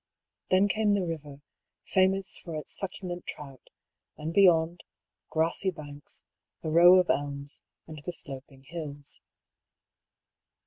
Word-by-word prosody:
Then 190 +2 +4
came 210 0 +2
the 195 -3 0
river, 150 -4 -6 0.4
famous 190 0 +2
for 165 -3 -8
its 155 - -3
succulent 180 -2 -2
trout, 135 -3 -9 0.5
and 155 +2 -5
beyond, 170 -3 +4 0.5
grassy 165 +4 +4
banks, 145 -4 -5 0.4
a 155 - -2
row 175 +3 +8
of 180 -1 +3
elms, 140 0 -4 0.2
and 155 -2 -10
the 180 - -4
sloping 135 -4 -8
hills. 145 -1 -7
165 Hz, 120 wpm, -28 LUFS, 145-185 Hz, 0.5 s, row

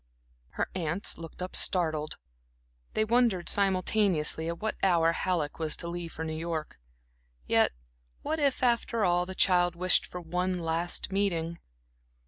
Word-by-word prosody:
Her - - 0
aunts 175 +1 0
looked 165 +2 -8
up 185 - -6
startled. 155 -4 +1 0.8
They 215 - +2
wondered 230 -6 +2
simultaneously 185 -5 +2
at 170 0 -3
what 220 0 -2
hour 170 -3 +3
Halleck 170 -4 -2
was 155 -2 -1
to 170 - -4
leave 170 -1 -5
for 160 - -5
New 160 - -4
York. 160 - -4 0.7
Yet - - +3 0.5
what 315 - -2
if 280 -3 +1
after 235 -3 +1
all 175 0 +2
the 190 - -7
child 175 -2 +3
wished 180 +1 +3
for 180 - -7
one 180 +2 -2
last 165 +3 0
meeting? 170 -4 -1
175 Hz, 145 wpm, -29 LUFS, 165-195 Hz, 0.8 s, hour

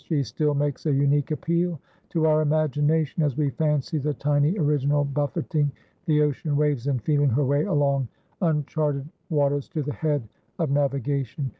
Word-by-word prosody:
She 150 -4 0
still 145 +4 -1
makes 145 +2 -1
a - - +3
unique 140 +1 +2
appeal 170 +1 -1 0.3
to 160 -2 +1
our 155 0 +4
imagination 155 +1 +1
as 145 -5 0
we 145 -3 +1
fancy 150 -1 0
the 145 +1 -2
tiny 145 +5 +1
original 145 -2 +2
buffeting 145 +1 -1 0.4
the 150 -2 +4
ocean 150 0 -1
waves 145 -4 +1
and 135 -3 +1
feeling 145 -2 +2
her 135 +4 +1
way 145 +3 +2
along 140 -3 +1 0.3
uncharted 150 -3 0 0.2
waters 145 -3 +1
to 160 -5 -3
the 145 +1 -3
head 145 -7 -1 0.3
of 160 -5 -1
navigation. 140 -1 -1
145 Hz, 160 wpm, -25 LUFS, 140-155 Hz, 0.4 s, our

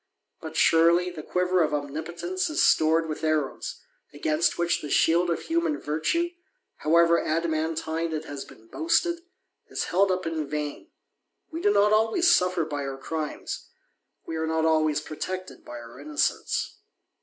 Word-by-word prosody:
But, - - -6
surely, 170 +2 +4
the 165 -3 -7
quiver 180 +3 +1
of 150 -2 +1
Omnipotence 165 - -3
is 310 - +1
stored 160 +1 +4
^th 155 -1 -5
arrows, 155 -3 -1 0.3
against 155 +2 0
which 170 0 +1
the 150 - -6
shield 170 +4 +3
of 170 - -1
human 330 -2 0
virtue, 160 - 0 0.5
however 170 +1 +4
adamantine 160 0 -1
it 155 -1 -3
has 145 -1 -6
been 110 - -16
boasted, 335 - +1 0.5
is - - -3
held 190 +2 +2
up 185 -1 -1
in 160 -3 -3
vain: 150 -1 -4 0.6
^e 330 - -4
do 410 - +3
not 210 - +4
always 225 +11 +3
suffer 180 - +3
by 145 -2 -4
our 135 -1 -4
crimes; 155 +2 -5 0.6
we 165 - -5
are 160 0 -1
not 160 0 +1
always 155 -2 +2
protected 185 +4 -6
by 120 - -8
our 120 +2 -11
innocence. 145 0 -1
165 Hz, 155 wpm, -26 LUFS, 155-185 Hz, 0.6 s, surely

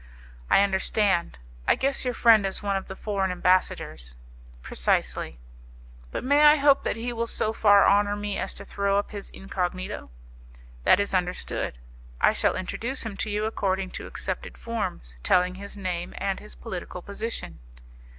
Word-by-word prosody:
"I 200 - +6
understand. 190 - +1 0.3
I - - +5
guess 275 +1 0
your 250 -1 -1
friend 225 -3 +6
is 195 +1 -2
one 200 -1 0
of 195 - -3
the 190 - -7
foreign 195 -2 -1
ambassadors." 180 - +1 0.5
"Precisely." - - -1 0.7
"But - - -4
may 285 +3 +4
I 300 0 +8
hope 280 -1 +5
that - - -1
he 240 +2 -3
will 230 0 -2
so 220 -1 -1
far 205 -2 +6
honour 205 0 +4
me 205 -1 -3
as - - -3
to - - -7
throw 200 0 0
up 205 - -1
his 205 -2 -7
incognito?" 185 -1 -4 0.8
"That - - +6
is 200 0 0
understood. 180 - -1 0.4
I - - +5
shall - - +1
introduce 230 +8 -3
him 220 -3 -4
to 215 - -2
you 210 +1 0
according 195 -3 -1
to - - -6
accepted - - -5
forms, 190 - -4
telling 180 - +3
his 200 +2 -9
name 180 -3 -3
and 195 -1 -1
his 210 - -9
political 180 -4 -7
position." 215 - -5
200 Hz, 165 wpm, -26 LUFS, 185-220 Hz, 0.8 s, I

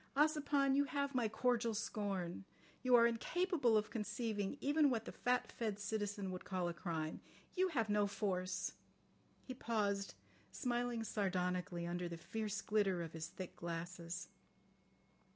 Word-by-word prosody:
Ossipon, 290 -2 +4
you 285 +1 +4
have 280 +1 -1
my 245 -3 +2
cordial 235 0 +2
scorn. 195 -5 -2 0.4
You 255 -1 +6
are 235 -1 +8
incapable 250 +1 +2
of 210 0 0
conceiving 215 0 -2
even 290 +1 +4
what 225 -3 0
the - - -5
fat 250 0 +1
fed 215 -4 -2
citizen 205 -2 -2
would 185 - -5
call 185 -2 -1
a 175 - -1
crime. 160 -1 -3 0.3
You 375 0 +4
have 240 - +1
no 205 -1 +3
force." 185 -2 -1 0.7
He 255 - -5
paused, 205 -5 0 0.4
smiling 240 -2 0
sardonically 180 -4 0
under 175 0 -2
the 170 - -5
fierce 215 +4 -3
glitter 195 -5 +2
of 165 - -7
his 160 0 -4
thick 185 +1 -7
glasses. 170 +1 -4
210 Hz, 145 wpm, -39 LUFS, 185-245 Hz, 0.7 s, are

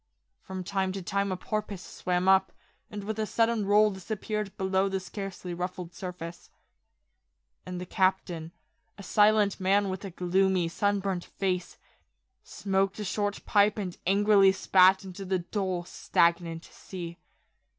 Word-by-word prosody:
From 190 -1 -6
time 190 0 -1
to 195 -1 -5
time 200 +2 -1
a 185 - -2
porpoise 210 -2 -4
swam 180 +1 -2
up, 190 -1 +5 0.4
and 205 -1 -6
with 220 +1 -4
a 215 - 0
sudden 230 -2 +1
roll 210 +1 +5
disappeared 210 +1 -4
below 190 +1 +1
the 195 0 -1
scarcely 190 -1 -6
ruffled 180 0 -5
surface. 175 -1 -8 1.2
And 180 -1 -5
the 180 - -5
captain, 180 -3 0 0.5
a 200 - -10
silent 210 +1 +3
man 195 +1 +2
with 185 +1 -5
a 195 - -5
gloomy, 180 0 +1
sunburnt 195 -1 -1
face, 185 -2 -3 0.7
smoked 195 0 -1
a 215 - -4
short 205 +1 -2
pipe 210 0 +3
and 185 -4 -4
angrily 200 0 +5
spat 190 0 +5
into 190 +1 -7
the 190 0 0
dull, 185 0 -2
stagnant 170 -1 0
sea. 175 -2 -9
190 Hz, 140 wpm, -28 LUFS, 180-200 Hz, 1.2 s, up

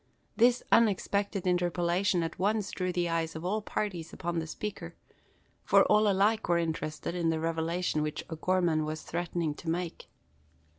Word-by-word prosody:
This 245 +2 +4
unexpected 200 -2 +2
interpolation 175 0 +1
at 165 +1 -5
once 210 +1 0
drew 185 -1 -2
the 175 -1 0
eyes 165 -1 -1
of 160 +2 -6
all 210 +4 0
parties 185 -6 -3
upon 170 0 -3
the 160 - -4
speaker; 175 -1 -6 0.7
for - - +5
all 210 +1 +4
were - - +4
alike 205 +2 +2
interested 165 -2 -1
in 170 -2 0
the 160 -1 0
revelation 165 0 -1
which 150 0 -3
O'Gorman 165 -1 +1
was 155 +1 -4
threatening 170 -2 -2
to 160 - -7
make. 170 0 -3
175 Hz, 155 wpm, -30 LUFS, 165-195 Hz, 0.7 s, for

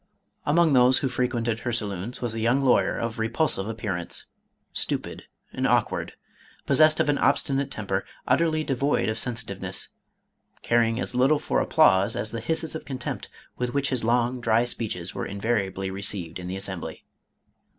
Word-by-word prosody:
Among 160 +1 +4
those 130 0 +6
who 135 - 0
frequented 120 -3 -1
her 120 +1 -3
saloons, 105 +1 -3
was 120 -2 0
a 115 - -3
young 120 +5 +2
lawyer 130 - +3
of 115 0 -3
repulsive 115 -2 +1
appearance, 100 -6 -4 0.5
stupid - - -1 0.3
and - - 0
awkward, - - +1 0.5
possessed 155 +3 +5
of - - +2
an 145 -1 +2
obstinate 135 0 +1
temper, 95 -2 -2 0.2
utterly 155 +4 +2
devoid 140 -3 +1
of 110 0 -1
sensitiveness, 120 -1 -4 0.7
caring 115 0 +2
as - - -1
little 130 +5 +4
for 150 - 0
applause 100 -12 +4
as 110 - -1
the 115 0 -4
hisses 160 +5 -1
of 160 - -5
contempt 130 -3 -5 0.3
with 125 0 -2
which 140 -1 +1
his 130 -4 -1
long, 120 +2 +1
dry 115 +1 +3
speeches 105 -7 -4
were - - -4
invariably 100 -2 -1
received 95 -3 -3
in 90 - -6
the 95 +1 -4
Assembly. 95 -3 -5
120 Hz, 160 wpm, -26 LUFS, 105-135 Hz, 0.7 s, those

